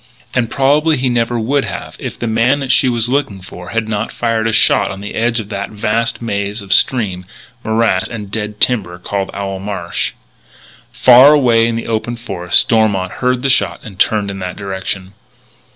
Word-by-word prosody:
And 120 -3 0
probably 150 +5 +2
he 130 0 0
never 120 0 0
would 135 +5 0
have - - -6
if - - -6
the - - -4
man 115 +5 +2
that 135 -1 -1
she 130 - +4
was 120 -1 0
looking 125 -7 -1
for 90 -1 -10
had 115 -1 -2
not 110 0 -2
fired 115 -1 -1
a - - +1
shot 110 - +3
on 95 0 -6
the 105 +1 -7
edge 115 +1 0
of 105 -2 -7
that 100 -2 -4
vast 115 +3 -1
maze 100 -1 -3
of 95 0 0
stream, 100 -6 +1 0.4
morass 110 -4 +1
and 105 -5 -7
dead 105 -1 -4
timber 105 -8 0
called 95 +2 -3
Owl 100 -1 -4
Marsh. 95 -4 -3 0.8
Far 130 +4 +7
away 115 -5 +3
in 115 - -1
the 115 - -4
open 115 +1 -2
forest 90 -7 +1
Stormont 100 -5 +1
heard 125 +3 -1
the - - +2
shot - - +1
and 100 -5 -11
turned 105 -1 +1
in 95 - -7
that 90 -1 -5
direction. 95 -1 -5
110 Hz, 190 wpm, -16 LUFS, 100-120 Hz, 0.8 s, Far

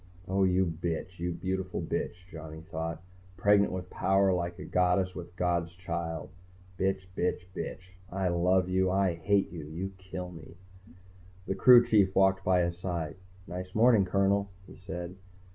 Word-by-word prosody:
Oh, 95 +1 +2
you 95 0 +3
bitch! 85 +2 -4
You 90 +1 -1
beautiful 95 +1 -3
bitch, - - -2 0.2
Johnny 80 -1 -8
thought. 80 +1 -4 0.3
Pregnant 100 +1 +4
with 90 -1 -5
power 95 0 +3
like 85 -1 -2
a - - -7
goddess 90 +1 +2
with 90 -2 -7
a 85 - -24
god's 85 -1 0
child. 85 -2 -4 0.5
Bitch, 95 0 0
bitch, 90 0 -1
bitch! 95 0 -6 0.2
I 95 0 0
love 90 +1 +2
you. 95 0 +2
I 95 -1 +2
hate 95 +4 +1
you. 80 -4 -7
You 90 +5 -5
kill 90 -1 -6
me. 80 -1 -12 0.9
The - - -1
crew 120 +3 +7
chief 100 -5 +3
walked 95 0 +4
by 90 -1 +3
his 85 0 -2
side. 85 -4 -3 0.3
"Nice 90 0 -7
morning, 115 -2 +5
Colonel," 100 +2 +2 0.2
he - - -13
said. 90 0 -7
90 Hz, 160 wpm, -30 LUFS, 85-95 Hz, 0.9 s, crew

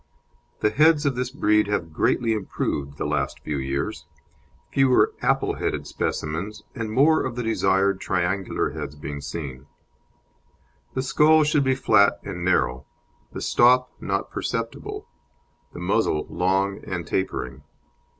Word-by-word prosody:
The 105 - +3
heads 155 0 +4
of 140 -3 +1
this 125 0 -2
breed 105 -6 +2
have 85 -6 -2
greatly 115 +7 +1
improved 75 -8 -3
the - - -3
last 70 -2 -1
few 75 -2 -3
years; 70 +1 -3 0.6
fewer 135 -2 +4
"apple - - +1
headed" - - -2
specimens, 85 +8 -3
and 115 -3 -4
more 150 +7 +4
of 130 -2 -3
the 125 - -3
desired 100 -3 +1
triangular 95 +1 -1
heads 75 -2 -6
being 70 0 -6
seen. 70 -2 -6 1.3
The 130 - 0
skull 155 +3 +5
should 150 -1 +2
be 130 0 +2
flat 110 -6 +4
and - - -5
narrow, 65 +1 +1 0.4
the - - -6
stop 125 +1 +4
not - - -2
perceptible, - - -4 0.6
the - - -9
muzzle 75 - +1
long 95 +2 0
and 90 -4 -4
tapering. 65 -7 -3
100 Hz, 135 wpm, -24 LUFS, 75-125 Hz, 1.3 s, skull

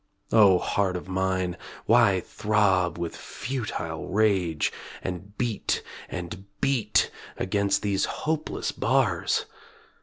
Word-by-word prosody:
O 100 -5 +7
heart 95 +1 0
of 90 - -8
mine, 95 -1 0 0.3
why 110 -6 +5
throb 95 -6 +1
with 85 -1 -3
futile 110 -10 -4
rage 95 -6 +2 0.3
And 95 +3 -6
beat 120 -4 -1 0.3
and 90 +2 -6
beat 120 -6 +2 0.3
against 100 +1 +1
these 100 -2 +1
hopeless 155 0 -2
bars? - - +1
95 Hz, 100 wpm, -26 LUFS, 90-110 Hz, 0.3 s, O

